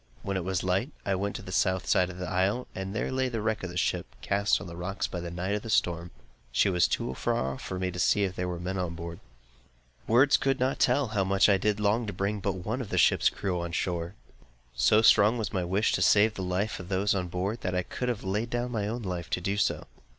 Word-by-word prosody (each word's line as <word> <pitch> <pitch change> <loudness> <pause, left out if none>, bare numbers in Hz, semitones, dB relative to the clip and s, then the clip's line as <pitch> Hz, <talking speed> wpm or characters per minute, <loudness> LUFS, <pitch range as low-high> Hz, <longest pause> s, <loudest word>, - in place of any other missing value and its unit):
When 100 - -2
it 95 - -1
was 95 0 -1
light, 95 +8 0 0.2
I 100 - +1
went 100 +2 -2
to - - -6
the 95 - -8
South 95 0 +1
side 90 0 +3
of 90 - -9
the 90 0 -4
isle, 95 +7 0
and 95 +2 -5
there 105 - -1
lay 130 0 0
the 115 -2 -3
wreck 110 0 -1
of 95 - -4
a 90 - -6
ship, - - 0 0.2
cast 100 +1 +2
on 90 - -8
the 85 -2 -8
rocks 95 +3 -3
in - - -7
the 85 - -4
night 90 +3 -3
by 105 - 0
the 115 - -9
storm. 85 -4 +1 0.4
She 100 - +3
was 90 -1 +3
too 65 - -2
far 65 +1 -1
off 65 - -9
for 95 - -5
me 90 0 -1
to 90 - -6
see 100 +3 +3
if 95 -1 -2
there 90 - -2
were 90 -1 -4
men 95 +2 -3
on 85 -2 -3
board. 85 0 -7 0.9
Words 130 +5 +5
could 135 -1 0
not 130 +2 0
tell 140 -5 +3
how 105 -3 +1
much 95 +1 +3
I 100 - +5
did 105 +1 0
long 105 +3 +1
to 105 - -4
bring 100 +3 -1
but 100 0 -1
one 115 +5 -2
of 110 - -6
the - - -2
ship's - - +4
crew 90 -3 -3
to 85 - -3
the - - -10
shore! 85 +1 -2 0.6
So 105 - +4
strong 110 +1 +6
was 110 -4 -3
my 95 - 0
wish 95 +5 +1
to - - 0
save 105 +4 +5
the 95 - -6
life 95 +4 -1
of 90 - -9
those 100 +1 +1
on 90 -2 -1
board, 95 +6 -3
that 90 -1 -2
I 90 - +1
could 125 +7 -3
have 120 -4 -3
laid 105 +5 -1
down 120 0 -2
my 105 -4 -1
own 115 +2 -4
life 90 -4 -4
to - - -1
do 100 +3 -1
so. 100 - 0
95 Hz, 270 wpm, -28 LUFS, 90-105 Hz, 0.9 s, strong